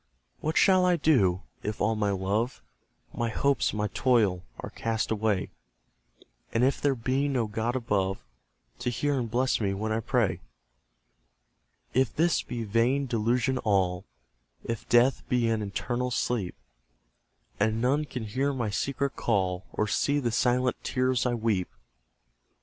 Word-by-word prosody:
What 155 +1 -1
shall 185 -2 +5
I 180 -1 +4
do, 100 - +2 0.2
if 105 +1 -4
all 110 +2 +2
my 105 -1 0
love, 100 +6 -1 0.5
My 120 -1 -1
hopes, 140 +3 +1
my 105 0 -1
toil, 115 -7 +2 0.2
are - - -6
cast 115 -1 -2
away, 105 -3 0 1.0
And 115 - +1
if 135 +2 +2
there 140 -2 +2
be 130 +4 0
no 130 -5 0
God 110 +3 -2
above, 100 -6 -1 0.5
To 120 0 -1
hear 140 +3 0
and 120 -2 -3
bless 125 +1 +1
me 100 -2 0
when 110 +2 -3
I 110 - +1
pray? 115 -2 0 1.5
If 130 -3 +1
this 165 +1 +2
be 120 -1 -5
vain 115 +6 +1
delusion 120 +2 0
all, 95 -4 +1 0.6
If 115 -2 -5
death 120 +3 +4
be 125 -2 +2
an 110 -1 0
eternal 120 +5 -2
sleep, 115 -6 -1 1.0
And 110 +2 +1
none 140 +6 +1
can 125 -5 -6
hear 130 +7 -1
my 120 -5 -2
secret 140 +5 -1
call, 95 -4 0
Or 105 - 0
see 140 +6 +1
the 120 -4 -1
silent 125 +2 +1
tears 130 -1 +1
I 120 - 0
weep! 110 -5 0
115 Hz, 150 wpm, -28 LUFS, 105-130 Hz, 1.5 s, shall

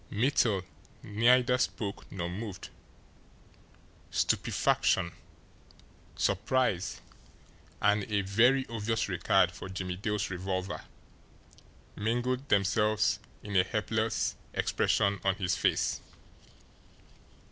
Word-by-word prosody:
Mittel 110 -4 +2 0.4
neither 125 +4 +3
spoke 105 -5 -3
nor 85 -3 -3
moved. 95 +2 -6 1.4
Stupefaction, 85 -2 +1 1.0
surprise, 115 -8 0 0.8
and 105 0 +2
a 100 -1 +2
very 120 +8 +3
obvious 115 0 -1
regard - - +2
for 95 - -9
Jimmie 90 -1 -4
Dale's 105 0 -2
revolver 95 +1 -3 1.1
mingled 125 +5 -1
themselves 105 +2 +2 0.2
in 105 -1 -5
a 90 - +6
helpless 110 +2 -1 0.2
expression 100 -1 +1
on 95 -1 +2
his 95 -3 0
face. - - +1
105 Hz, 85 wpm, -30 LUFS, 95-115 Hz, 1.4 s, a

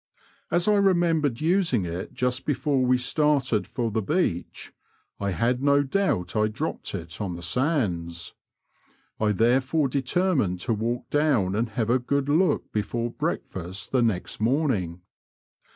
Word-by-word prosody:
As 175 +2 +2
I 210 -1 +4
remembered 170 -9 +2
using 165 - +2
it 85 +2 -5
just 125 0 0
before 140 -1 +1
we 125 0 +3
started 135 -2 +1
for 115 -3 -2
the 110 +1 0
beach, 100 - -2 0.5
I 100 - -1
had 120 +6 0
no 140 0 +4
doubt 135 - 0
I 110 0 +3
dropped 110 0 -4
it 85 +3 -7
on 95 -4 -3
the 85 - -8
sands. 85 - -1 0.9
I 110 -1 +2
therefore 130 +7 +2
determined 135 - +1
to 115 - 0
walk 115 +3 -2
down 140 -11 +2
and 115 +2 0
have 110 +1 -1
a 130 - +3
good 140 +3 -1
look 170 +5 +2
before 115 +3 -2
breakfast 95 -2 -4
the 130 - +3
next 110 -6 -1
morning. 110 - 0
125 Hz, 145 wpm, -25 LUFS, 100-145 Hz, 0.9 s, I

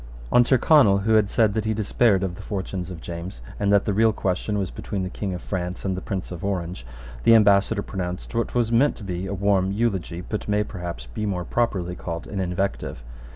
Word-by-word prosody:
On 120 - +6
Tyrconnel, 120 -5 +5
who 110 +1 +2
had 105 -2 +4
said 110 -3 +3
that 110 0 -1
he 110 0 0
despaired 105 -1 +2
of 95 -2 -2
the - - -9
fortunes 95 -3 -4
of 90 -3 -8
James, 85 -4 -6 0.2
and 100 0 +2
that 100 -1 +4
the 105 - 0
real 110 +2 +4
question 100 +1 -1
was 95 -2 -2
between 100 -3 -4
the 90 - -4
King 100 0 -3
of 90 - -8
France 90 -1 -4
and 95 -1 0
the 95 - -5
Prince 95 -3 -4
of 90 -1 -7
Orange, 90 -8 -3 0.4
the 115 - +7
ambassador 100 0 +4
pronounced 90 -1 -5
what 115 +1 -1
was 120 -2 +2
meant 125 +5 +4
to 110 - -11
be 90 -1 -4
a 100 - -3
warm 95 -1 +2
eulogy, 95 -5 -1
but 105 +3 -5
may 105 0 +2
perhaps 90 - -6
be - - -4
more 90 -3 -2
properly 95 -7 -1
called 85 -2 -5
an 100 - -5
invective. 90 -7 -2
100 Hz, 220 wpm, -24 LUFS, 90-105 Hz, 0.4 s, the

